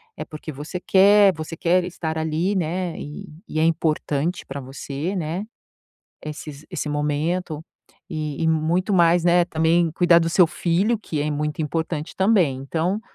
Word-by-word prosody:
é - - -5
porque 155 +1 -8
você 150 +6 -6
quer, 200 +1 +5
você 160 +1 -7
quer 180 +2 +2
estar 160 -3 -4
ali, 160 +5 0
né, 175 0 -2
e 145 +1 -8 0.2
e 155 - -3
é - - +3
importante 160 0 0
para 140 0 -6
você, 140 +7 -5
né, 170 +2 -2 0.8
esses 150 -1 -8
esse - - -3
momento 150 +2 -2 0.5
e 155 -2 -4
e 160 - +2
muito 165 +5 +1
mais, 175 -2 +4
né, 175 0 +5
também 165 +1 +2
cuidar 170 0 +5
do 165 -1 0
seu 170 +1 +5
filho, 185 +7 0
que 155 -8 -4
é 150 - -1
muito 150 +1 -2
importante 160 0 -3
também, 190 -10 +3
então 170 +8 -1
165 Hz, 160 wpm, -23 LUFS, 150-180 Hz, 0.8 s, quer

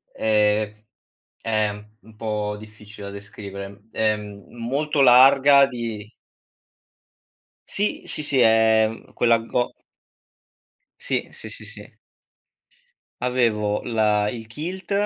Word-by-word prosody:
ehm, 105 0 +1 0.6
è 110 -2 0
m 105 0 -10 0.2
un 110 -1 -18
po' 105 -2 -3
difficile 105 -1 -12
da 100 - -8
descrivere. 100 0 -9
Ehm, 105 -2 -2
molto 140 +5 -1
larga 135 +2 +7
di 115 -4 -6 1.6
Sì, 205 +1 -1
sì, 150 - 0
sì, 145 -3 +2
è, 110 -1 +5
uhm, 115 - -11
quella 115 -1 +3
go 120 +2 -2 1.3
Sì. - - -2
Sì, - - -7
sì, - - -4
sì. - - -8 1.3
Avevo 115 -5 0
la 105 -3 +1
il 110 0 -6
kilt, 175 - -6
110 Hz, 110 wpm, -23 LUFS, 105-125 Hz, 1.6 s, larga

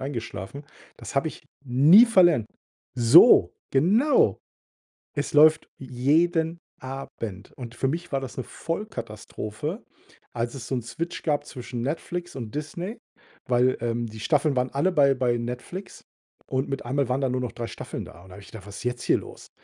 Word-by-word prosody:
eingeschlafen. 135 0 -6 0.3
Das - - -9
habe 140 +3 +2
ich - - -12 0.2
nie 150 - +7
verlernt. 175 - +4 0.5
So, 120 -2 +7 0.2
genau. 205 - +3 0.8
Es 145 0 -3
läuft 155 +1 +6
jeden 160 +6 +1 0.2
Abend 130 -7 -7
und 120 -2 -8
für 135 +2 -1
mich 170 +2 -4
war 135 - 0
das 135 - -8
'ne 130 - -4
Vollkatastrophe, 160 - -6 0.5
als 120 +2 -3
es 125 -3 -8
so 135 - -1
'n 120 - -3
Switch 165 +9 -5
gab 145 -2 0
zwischen 125 -2 -6
Netflix 175 +5 -4
und 115 -3 -7
Disney, 170 +8 -5 0.5
weil, 125 +1 +3
ähm, 120 0 -2
die 110 0 -10
Staffeln 145 +4 +1
waren 125 0 0
alle 150 +7 +1
bei 140 -4 +4
bei 125 -2 +1
Netflix 125 +11 -7 0.4
und 130 +1 -1
mit 135 -2 -4
einmal 135 +1 0
waren 130 +2 0
da 135 - +1
nur 125 0 -1
noch 125 - -3
3 120 -1 -5
Staffeln - - -7
da 85 - -14
und 95 - -16
da - - -11
habe 100 - -12
ich - - -15
gedacht: 105 -3 -10
„Was 100 - -9
ist - - -9
jetzt 125 0 -2
hier - - +4
los?“ - - -12
135 Hz, 175 wpm, -25 LUFS, 120-160 Hz, 0.8 s, nie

